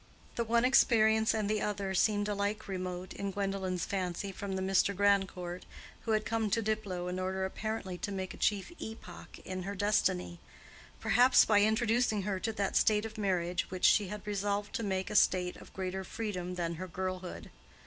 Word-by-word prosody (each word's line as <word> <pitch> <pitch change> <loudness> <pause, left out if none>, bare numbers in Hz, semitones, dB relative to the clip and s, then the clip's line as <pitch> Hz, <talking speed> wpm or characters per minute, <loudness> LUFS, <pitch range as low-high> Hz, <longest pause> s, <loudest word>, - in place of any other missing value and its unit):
The 235 - 0
one 235 +1 +2
experience 220 -4 +4
and 215 -2 -1
the 210 0 0
other 200 -2 -2
seemed 205 +2 +2
alike 205 +1 -2
remote 185 -1 -4
in 200 - -3
Gwendolen's 195 -2 -2
fancy 190 0 -3
from 195 0 -5
the 190 - -2
Mr. 195 +1 +2
Grandcourt 190 -3 +1 0.4
who 225 - 0
had 215 0 +1
come 225 -2 0
to 230 +3 +1
Diplow 205 -5 -2
in 180 +1 -3
order 190 +1 -1
apparently 190 -2 -4
to 200 - -3
make 190 -1 -4
a - - -11
chief 205 - 0
epoch 220 0 -9
in 185 0 -4
her 200 +3 -4
destiny—perhaps 205 - +1
by 205 -2 +4
introducing 220 0 +2
her 195 -1 -2
to 225 +4 -1
that 200 -3 -2
state 215 0 +3
of 220 0 -7
marriage 180 -3 0
which 185 -1 -1
she 205 -3 +5
had 210 +2 -7
resolved 205 0 -2
to - - -2
make 190 -3 -2
a - - -4
state 180 -2 +3
of - - -14
greater 190 0 -4
freedom 180 -3 -4
than 170 -2 -2
her 185 - -4
girlhood. 185 0 -5
200 Hz, 180 wpm, -32 LUFS, 185-215 Hz, 0.4 s, she